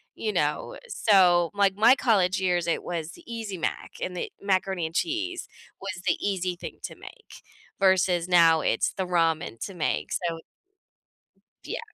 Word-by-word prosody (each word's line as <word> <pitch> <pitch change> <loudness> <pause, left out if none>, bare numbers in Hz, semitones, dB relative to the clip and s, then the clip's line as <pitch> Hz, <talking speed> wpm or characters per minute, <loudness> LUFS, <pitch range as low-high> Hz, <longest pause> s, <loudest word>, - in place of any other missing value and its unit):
you 430 - -3
know? - - -1
Eh, - - -11
so, 180 - +4
like, 200 -1 +2
my 225 +6 +6
college 190 -7 +2
years, 175 -2 +1
it 170 - 0
was 170 -2 -4
the 345 - -15
Easy 220 -4 -5
Mac, 165 - -3
and 180 - -3
the - - -4
macaroni 190 -3 0
and 160 +1 -6
cheese 345 - -2 0.3
was 195 -2 -6
the - - +3
easy 185 -3 -1
thing - - -8
to - - -6
make, 455 -3 -14 0.4
versus 185 -2 +3
now 165 -3 +6
it's - - +1
the 190 - -2
ramen 165 -8 0
to 195 - -8
make, 75 - -2
so 170 -2 -2 1.3
Yeah. - - -4
185 Hz, 165 wpm, -26 LUFS, 170-200 Hz, 1.3 s, my